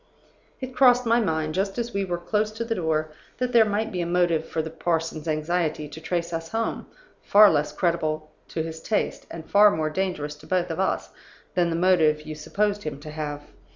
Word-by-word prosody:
"It 260 Hz, 0 st, -5 dB
crossed 250 Hz, -1 st, +5 dB
my 230 Hz, +1 st, +4 dB
mind, 160 Hz, -7 st, -1 dB
just 195 Hz, +3 st, -1 dB
as 235 Hz, 0 st, -3 dB
we 200 Hz, 0 st, 0 dB
were 175 Hz, -2 st, -2 dB
close 210 Hz, +5 st, -1 dB
to 230 Hz, +2 st, -4 dB
the 230 Hz, -, -1 dB
door, 155 Hz, -5 st, -1 dB, 0.3 s
that 250 Hz, 0 st, -1 dB
there 230 Hz, -3 st, +6 dB
might 215 Hz, +2 st, -1 dB
be 180 Hz, -3 st, -2 dB
a 170 Hz, -, -2 dB
motive 175 Hz, -2 st, +2 dB
for 160 Hz, -, -1 dB
the 160 Hz, -, -6 dB
parson's 165 Hz, -1 st, -2 dB
anxiety 155 Hz, 0 st, -1 dB
to 155 Hz, +2 st, -10 dB
trace 170 Hz, 0 st, -2 dB
us 165 Hz, 0 st, -4 dB
home, 225 Hz, 0 st, -2 dB, 0.3 s
far 210 Hz, 0 st, +7 dB
less 150 Hz, -1 st, 0 dB
creditable 155 Hz, -3 st, -1 dB, 0.2 s
to 160 Hz, -, -3 dB
his 160 Hz, 0 st, -7 dB
taste, 215 Hz, -, -2 dB
and 160 Hz, -1 st, -8 dB
far 210 Hz, +1 st, +7 dB
more 155 Hz, -5 st, -1 dB
dangerous 165 Hz, -5 st, -2 dB
to -, -, -16 dB
both 180 Hz, -2 st, 0 dB
of 165 Hz, -, -4 dB
us, 190 Hz, -, -1 dB, 0.4 s
than 175 Hz, -1 st, +2 dB
the 165 Hz, -, -1 dB
motive 165 Hz, -4 st, +3 dB
you 155 Hz, 0 st, -6 dB
supposed 205 Hz, +7 st, -1 dB
him 150 Hz, -5 st, -5 dB
to 150 Hz, +1 st, -9 dB
have. 150 Hz, -1 st, -4 dB
170 Hz, 210 wpm, -25 LUFS, 155-205 Hz, 0.4 s, far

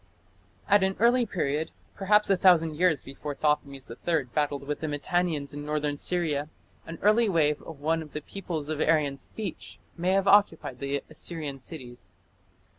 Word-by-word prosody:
At 205 Hz, -1 st, +5 dB
an 190 Hz, 0 st, +1 dB
early 240 Hz, +1 st, +4 dB
period, 155 Hz, -5 st, -1 dB, 0.2 s
perhaps 210 Hz, +1 st, +3 dB
a -, -, +6 dB
thousand 175 Hz, -4 st, +4 dB
years 165 Hz, -3 st, +2 dB
before 140 Hz, +2 st, -6 dB
Thothmes 140 Hz, -3 st, -1 dB
III 155 Hz, +6 st, -1 dB
battled 145 Hz, -2 st, -1 dB
with 150 Hz, +1 st, -3 dB
the 160 Hz, -, -3 dB
Mitannians 150 Hz, 0 st, -1 dB
in 145 Hz, 0 st, -6 dB
northern 150 Hz, -1 st, -2 dB
Syria, 155 Hz, -5 st, 0 dB, 0.4 s
an 165 Hz, 0 st, -6 dB
early 215 Hz, +2 st, +4 dB
wave 150 Hz, -4 st, +2 dB
of 155 Hz, -4 st, -11 dB
one 160 Hz, +2 st, +1 dB
of 155 Hz, -2 st, -11 dB
the 150 Hz, -, -4 dB
peoples 160 Hz, -4 st, -5 dB
of 155 Hz, -1 st, -2 dB
Aryan 145 Hz, -4 st, +2 dB
speech 105 Hz, -, -6 dB, 0.2 s
may 180 Hz, +2 st, 0 dB
have 195 Hz, 0 st, +2 dB
occupied 200 Hz, -10 st, +3 dB
the 140 Hz, 0 st, -2 dB
Assyrian 155 Hz, -3 st, -6 dB
cities. 125 Hz, -4 st, -10 dB
155 Hz, 165 wpm, -27 LUFS, 145-180 Hz, 0.4 s, a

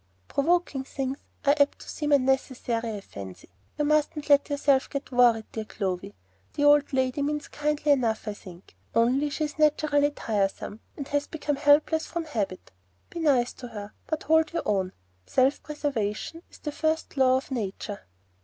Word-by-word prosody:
"Provoking 305 Hz, -2 st, +1 dB
things 270 Hz, 0 st, -4 dB, 0.3 s
are 285 Hz, -, +6 dB
apt 285 Hz, 0 st, +3 dB
to -, -, -12 dB
seem 295 Hz, -1 st, -3 dB
unnecessary, 255 Hz, -4 st, +1 dB
I 205 Hz, -, -6 dB
fancy. 95 Hz, -, -10 dB, 0.3 s
You 295 Hz, -, +1 dB
mustn't 300 Hz, 0 st, +1 dB
let 285 Hz, +1 st, +5 dB
yourself 280 Hz, -2 st, +2 dB
get 280 Hz, -1 st, -5 dB
worried, 240 Hz, -3 st, +4 dB
dear 220 Hz, -, -4 dB
Clovy. 195 Hz, -1 st, -4 dB, 0.4 s
The 290 Hz, -, 0 dB
old 290 Hz, 0 st, +5 dB
lady 260 Hz, +1 st, 0 dB
means 295 Hz, 0 st, -1 dB
kindly 300 Hz, 0 st, 0 dB
enough, 230 Hz, -6 st, +1 dB
I 210 Hz, -, -1 dB
think, 185 Hz, -3 st, -14 dB, 0.2 s
only 255 Hz, +6 st, +3 dB
she's 300 Hz, +1 st, -3 dB
naturally 295 Hz, -1 st, +3 dB
tiresome, 210 Hz, -4 st, -2 dB, 0.2 s
and 280 Hz, -, -5 dB
has 290 Hz, 0 st, 0 dB
become 295 Hz, -3 st, -2 dB
helpless 300 Hz, +2 st, +4 dB
from 340 Hz, -1 st, -3 dB
habit. 210 Hz, -10 st, -3 dB, 0.4 s
Be 340 Hz, -, -6 dB
nice 270 Hz, -7 st, +2 dB
to 245 Hz, -, -9 dB
her, 210 Hz, -3 st, -8 dB
but 315 Hz, -1 st, -2 dB
hold 320 Hz, 0 st, +3 dB
your 335 Hz, -, -1 dB
own. 190 Hz, -3 st, 0 dB, 0.3 s
Self 265 Hz, +2 st, +2 dB
preservation 285 Hz, -1 st, -3 dB
is -, -, -15 dB
the 300 Hz, -, -5 dB
first 315 Hz, +1 st, -1 dB
law 260 Hz, -1 st, +4 dB
of 270 Hz, +2 st, -6 dB
Nature." 205 Hz, -3 st, -4 dB
275 Hz, 165 wpm, -27 LUFS, 230-295 Hz, 0.4 s, are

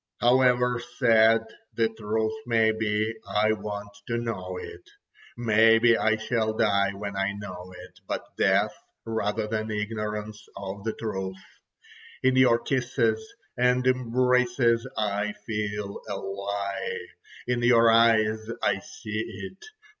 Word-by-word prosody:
"However 125 Hz, -1 st, +3 dB, 0.2 s
sad 115 Hz, -2 st, +5 dB, 0.3 s
the 115 Hz, -1 st, +3 dB
truth 110 Hz, +1 st, -2 dB
may 115 Hz, -2 st, +3 dB
be, 110 Hz, 0 st, -1 dB, 0.2 s
I 105 Hz, +1 st, +2 dB
want 105 Hz, -1 st, -4 dB, 0.2 s
to 115 Hz, -, -1 dB
know 115 Hz, -, -4 dB
it. 445 Hz, -3 st, -9 dB, 0.6 s
Maybe 115 Hz, 0 st, +5 dB
I 110 Hz, 0 st, +2 dB
shall 110 Hz, -1 st, -1 dB
die 100 Hz, -3 st, +2 dB
when 100 Hz, 0 st, -6 dB
I 95 Hz, 0 st, 0 dB
know 95 Hz, -3 st, -8 dB
it, -, -, -13 dB
but -, -, -5 dB
death -, -, +2 dB, 0.3 s
rather 110 Hz, -1 st, -1 dB
than 110 Hz, 0 st, -3 dB
ignorance 105 Hz, 0 st, -4 dB
of 100 Hz, 0 st, -6 dB
the 110 Hz, -, -1 dB
truth. 95 Hz, -4 st, -4 dB, 0.9 s
In 130 Hz, 0 st, +3 dB
your 130 Hz, -2 st, +5 dB
kisses 120 Hz, -3 st, 0 dB, 0.3 s
and 125 Hz, +1 st, +2 dB
embraces 125 Hz, -1 st, +2 dB
I 105 Hz, 0 st, -1 dB
feel 105 Hz, -2 st, -3 dB
a -, -, -2 dB
lie. 100 Hz, 0 st, -4 dB, 0.5 s
In 125 Hz, -1 st, -1 dB
your 115 Hz, -1 st, +5 dB
eyes 110 Hz, -1 st, +4 dB, 0.2 s
I 100 Hz, -1 st, +2 dB
see 110 Hz, +1 st, -6 dB, 0.3 s
it. 190 Hz, -, -20 dB
110 Hz, 125 wpm, -26 LUFS, 105-120 Hz, 0.9 s, sad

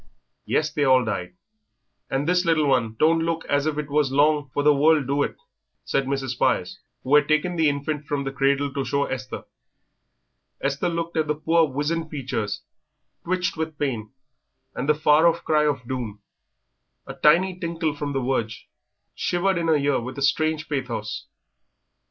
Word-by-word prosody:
"Yes, 155 Hz, 0 st, +1 dB
they 150 Hz, -, 0 dB
all 130 Hz, -2 st, +4 dB
died; 90 Hz, -4 st, -4 dB, 0.7 s
and 135 Hz, +2 st, -1 dB
this 180 Hz, 0 st, +3 dB
little 165 Hz, -3 st, +2 dB
one 125 Hz, -5 st, +1 dB
don't 165 Hz, +4 st, +4 dB
look 165 Hz, 0 st, -2 dB
as 145 Hz, +1 st, +1 dB
if 155 Hz, -1 st, -1 dB
it 150 Hz, -1 st, -3 dB
was 145 Hz, -2 st, +2 dB
long 145 Hz, 0 st, +2 dB
for 145 Hz, -, -1 dB
the 150 Hz, 0 st, +6 dB
world, 150 Hz, 0 st, +3 dB
do 140 Hz, +2 st, 0 dB
it?" -, -, -1 dB, 0.5 s
said 135 Hz, -, 0 dB
Mrs. 135 Hz, -1 st, -2 dB
Spires, 120 Hz, -, 0 dB, 0.2 s
who 135 Hz, -, -1 dB
had 150 Hz, -1 st, +5 dB
taken 155 Hz, +4 st, +1 dB
the 160 Hz, -3 st, +3 dB
infant 145 Hz, +1 st, -3 dB
from 145 Hz, -1 st, -1 dB
the 135 Hz, -, -3 dB
cradle 140 Hz, 0 st, +1 dB
to 140 Hz, -, -1 dB
show 140 Hz, +1 st, 0 dB
Esther. 130 Hz, -1 st, -5 dB, 1.2 s
Esther 140 Hz, +5 st, -1 dB
looked 170 Hz, 0 st, -3 dB
at 155 Hz, -1 st, +1 dB
the 150 Hz, -, 0 dB
poor 165 Hz, +2 st, +3 dB
wizened 150 Hz, +4 st, -2 dB
features, 115 Hz, -8 st, -3 dB, 0.6 s
twitched 185 Hz, +1 st, -1 dB
with 160 Hz, -1 st, -4 dB
pain, 120 Hz, -7 st, -2 dB, 0.6 s
and 135 Hz, +4 st, -3 dB
the 150 Hz, -, +5 dB
far 155 Hz, +2 st, +4 dB
off 170 Hz, 0 st, +1 dB
cry 150 Hz, -1 st, +2 dB
of 135 Hz, -5 st, -2 dB
doom, 115 Hz, -6 st, -5 dB, 0.8 s
a -, -, -7 dB
tiny 180 Hz, +4 st, +3 dB
tinkle 165 Hz, -3 st, -2 dB
from 145 Hz, 0 st, -4 dB
the 135 Hz, -, -1 dB
verge, 115 Hz, -4 st, -2 dB, 0.5 s
shivered 175 Hz, +1 st, 0 dB
in 165 Hz, -, -1 dB
the 160 Hz, -, +4 dB
ear 145 Hz, -1 st, +1 dB
with 125 Hz, +3 st, -7 dB
a 140 Hz, -, -2 dB
strange 155 Hz, +3 st, +1 dB
pathos. 125 Hz, -7 st, -4 dB
145 Hz, 175 wpm, -24 LUFS, 135-160 Hz, 1.2 s, the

